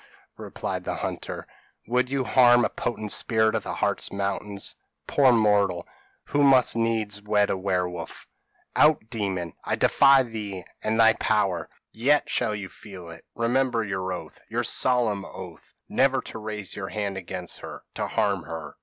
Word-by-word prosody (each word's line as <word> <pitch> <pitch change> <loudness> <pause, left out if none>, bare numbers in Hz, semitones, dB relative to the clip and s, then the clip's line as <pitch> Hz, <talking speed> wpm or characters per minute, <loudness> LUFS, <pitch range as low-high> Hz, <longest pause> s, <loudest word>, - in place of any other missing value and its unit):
replied - - -4
the - - -3
hunter, - - -5 0.4
'would 125 +2 +1
you 135 -1 0
harm 120 -1 +5
a - - 0
potent 110 -3 -3
spirit 110 -2 +2
of - - 0
the - - -5
Hartz - - -1
Mountains. 100 0 -2 0.3
Poor 135 -3 +4
mortal, 105 -6 +2 0.4
who 145 - 0
must 135 -4 +5
needs 110 -3 -1
wed 105 0 +2
a - - +1
werewolf.' 90 -3 -3 0.5
"'Out, 150 -7 +4
demon! 95 -7 -2
I - - 0
defy 135 -1 +5
thee 105 -6 -6 0.2
and 110 +1 0
thy 115 0 +7
power.' 100 -8 0 0.2
"'Yet 140 +6 +2
shall 105 - 0
you 100 -2 -5
feel 95 -5 -11
it; 85 - -12
remember 120 0 +1
your 95 -2 -3
oath 90 - -7
your - - -1
solemn 120 -6 +1
oath 90 -4 -10
never 135 0 +2
to 110 - -8
raise 105 -3 -5
your 95 -2 -5
hand 100 -2 -3
against 90 -1 -6
her - - -9
to - - -2
harm 100 -2 0
her.' 80 +1 -7
105 Hz, 160 wpm, -26 LUFS, 95-120 Hz, 0.5 s, thy